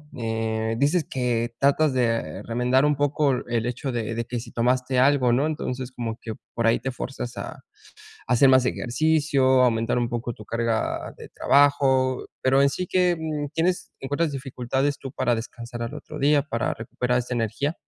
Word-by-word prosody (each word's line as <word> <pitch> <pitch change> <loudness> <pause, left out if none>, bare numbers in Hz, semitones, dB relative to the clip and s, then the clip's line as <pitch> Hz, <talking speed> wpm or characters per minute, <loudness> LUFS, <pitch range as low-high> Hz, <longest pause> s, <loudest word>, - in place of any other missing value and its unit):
eh, 110 -2 -2
dices 150 +5 +2
que 120 -2 -1
tratas 140 +2 +3
de 115 -3 -1
remendar 125 +3 +2
un 150 0 +2
poco 145 0 +1 0.2
el 120 -1 -1
hecho 125 +3 -3
de 115 -2 -3
de 115 +1 -3
que 120 +1 -4
si 115 - -10
tomaste 125 +2 +1
algo, 130 -2 +4
¿no? 135 +5 +2
Entonces, 130 -5 -4
como 115 -2 -5
que 110 - -5 0.2
por 115 -1 0
ahí 115 - +3
te 135 +2 -3
fuerzas 125 -1 -6
a - - -7 0.7
hacer 125 +3 +5
más 130 -1 +5
ejercicio, 135 0 +2
aumentar 115 -1 +1
un 120 -1 0
poco 120 0 -3
tu 110 - -12
carga 115 +1 -2
de - - -11
trabajo, 135 -2 +3 0.2
pero 135 +1 +4
en 140 - +5
sí, 180 +6 -3
¿que, 180 0 +2
mm, 155 -2 -3
tienes 175 +2 -1
encuentras 145 +3 -1
dificultades 135 +1 -2
tú 135 - -7
para 120 -4 +1
descansar 120 +1 -7
al 115 +4 -5
otro 150 0 -8
día 145 +1 +4
para 120 -5 -2
recuperar 125 +2 -1
esta 125 0 -4
energía? 125 +7 -1
125 Hz, 180 wpm, -24 LUFS, 120-140 Hz, 0.7 s, hacer